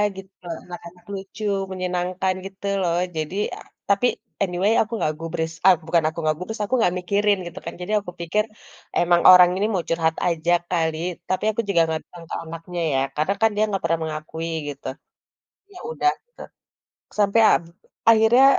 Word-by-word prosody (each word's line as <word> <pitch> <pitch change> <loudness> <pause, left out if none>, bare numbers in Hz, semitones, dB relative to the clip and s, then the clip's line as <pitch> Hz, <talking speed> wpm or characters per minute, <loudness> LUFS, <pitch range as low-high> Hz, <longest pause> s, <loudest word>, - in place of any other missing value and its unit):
gitu, 195 0 -10 0.3
anak-anak 175 0 -11
lucu, 195 +2 -7 0.3
menyenangkan 185 0 -1
gitu 195 +1 -9 0.2
loh 170 -1 +1 0.2
jadi 155 +4 -3 0.5
tapi 200 +4 +3 0.4
anyway, 185 +3 +1
aku 220 - -3
nggak 155 - 0
gubris 165 0 -3
eee, 190 - +8
bukan 165 -1 +3
aku 160 - -4
nggak 155 -1 +1
gubris, 215 +5 -6
aku 205 - -6
nggak 180 -6 +3
mikirin 200 +2 +2
gitu, 170 +2 -8
kan, - - -5
jadi 180 - -4
aku 180 - -8
pikir 210 +6 +1 0.6
emang 175 0 +4
orang 180 -1 +9
ini 205 - +1
mau 180 -3 0
curhat 165 -1 +1
aja 170 0 0 0.2
kali, 160 -3 0 0.3
tapi 185 +1 0
aku 220 - -1
juga 185 -4 +3
nggak 160 -1 -2
datang 175 -1 -13
ke - - -2
anaknya, 165 +2 -6
ya, 135 - +2 0.2
karena, 155 +6 +1
kan, 225 - +5
dia 210 - +2
nggak 195 -2 -2
pernah 165 0 +1
mengakui 160 +1 -5 0.2
gitu. 145 - -8 0.9
Ya, 360 - -11
udah 370 -6 +2 0.2
gitu, 485 - -16 0.8
sampai 205 +2 +4
ab - - +3 0.5
akhirnya 225 +3 +6
180 Hz, 170 wpm, -23 LUFS, 165-200 Hz, 0.9 s, orang